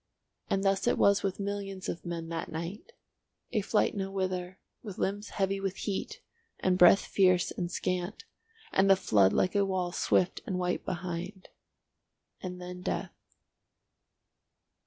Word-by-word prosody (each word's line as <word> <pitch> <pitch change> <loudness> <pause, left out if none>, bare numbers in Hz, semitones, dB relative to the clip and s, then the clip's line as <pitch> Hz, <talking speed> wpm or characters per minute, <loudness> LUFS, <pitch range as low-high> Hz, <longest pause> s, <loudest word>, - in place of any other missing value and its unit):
And 195 0 +1
thus 195 +2 +2
it - - +3
was 200 0 +4
with 195 -1 -2
millions 200 -1 -4
of 170 +1 -5
men 170 -1 -4
that 165 -1 -4
night—a 200 - -7
flight 210 +2 +2
nowhither, 190 -2 -2 0.2
with 205 -5 -8
limbs 205 +3 -2
heavy 195 0 0
with 195 -1 -2
heat 200 -1 -4 0.4
and 185 -1 +2
breath 180 +2 +8
fierce 185 -2 +3
and 175 -1 -3
scant, 180 - -2 0.5
and 195 +1 +3
the 195 - +8
flood 100 - +4
like 185 - +2
a 200 -1 +3
wall 185 -2 -1
swift 180 0 +1
and 185 - -1
white 180 0 -1
behind. 180 +2 -5 0.9
And 180 -1 -6
then 180 0 -7
death. - - -3
185 Hz, 140 wpm, -30 LUFS, 180-195 Hz, 0.9 s, breath